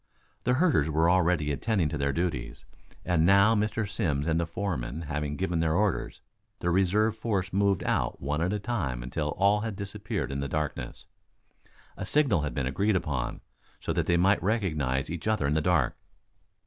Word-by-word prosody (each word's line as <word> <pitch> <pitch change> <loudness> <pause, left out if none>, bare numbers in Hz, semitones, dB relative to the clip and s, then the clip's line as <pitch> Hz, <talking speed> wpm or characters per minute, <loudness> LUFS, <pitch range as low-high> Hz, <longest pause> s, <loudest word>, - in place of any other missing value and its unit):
The 125 0 +3
herders 135 - +3
were 80 +3 +3
already 85 -4 +2
attending 95 +3 0
to 75 - -3
their 70 0 +1
duties. 75 -5 -3 0.4
And 90 -3 +2
now 100 +5 +6
Mr. 105 0 0
Simms 85 -7 -1
and 80 0 +2
the 85 - -1
foreman 80 -6 -3
having 75 -1 -3
given 90 -1 -1
their 80 -1 +1
orders, 100 -1 0 0.4
the 85 - -1
reserve 100 +4 +2
force 100 -5 -2
moved 100 -1 +2
out - - 0
one 75 +3 -2
at 90 +3 +1
a 105 - 0
time 90 - -3
until 75 +4 -3
all 100 +2 +4
had 110 -1 -4
disappeared 100 -2 -4
in 70 - -3
the 70 - -2
darkness. 75 0 -4 0.9
A - - -4
signal 135 - +3
had 75 0 -3
been 70 - -1
agreed 100 +11 +1
upon, 75 -9 -2 0.4
so - - -2
that - - -1
they 85 - +3
might 95 +4 +3
recognize 75 - 0
each 85 +3 -5
other 110 -9 +1
in 70 - +1
the 80 - +2
dark. 80 -6 +2
85 Hz, 185 wpm, -28 LUFS, 75-100 Hz, 0.9 s, now